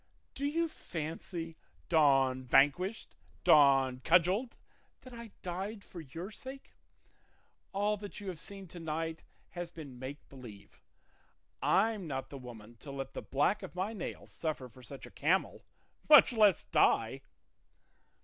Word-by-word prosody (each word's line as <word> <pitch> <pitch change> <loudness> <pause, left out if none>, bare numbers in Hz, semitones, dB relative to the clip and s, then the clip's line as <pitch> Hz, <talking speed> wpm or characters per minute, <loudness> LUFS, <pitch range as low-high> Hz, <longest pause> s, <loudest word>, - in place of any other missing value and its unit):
Do 280 +1 -2
you 330 +3 +1
fancy, 165 - -6 0.3
Don 135 -5 +4
Vanquished, 145 - +2 0.3
Don 135 -3 +5
Cudgelled, 185 - +2 0.4
that 255 - -12
I 235 -1 -8
died 195 +4 -4
for 175 - -9
your 165 +7 -7
sake? 265 +4 -10 1.0
All 205 +2 +1
that 205 0 -8
you 205 - -8
have 175 -4 -6
seen 195 +2 -8
to 175 - -9
night 160 0 -3 0.3
has 175 -1 -5
been 140 -7 -10
make 135 +3 -8
believe; 120 -7 -13 0.8
I'm 210 -2 +2
not 135 -3 -4
the 140 - -7
woman 115 -2 -11
to 140 - -11
let 135 -1 -5
the - - -5
black 145 +9 +1
of 190 -2 -9
my 190 +5 -2
nail 200 - -6
suffer 155 -5 -4
for 130 +3 -16
such 135 +1 -9
a - - -13
camel, 180 +6 0 0.4
much 300 -4 +9
less 210 -6 +5
die!" 135 -5 +2
165 Hz, 140 wpm, -32 LUFS, 135-200 Hz, 1.0 s, much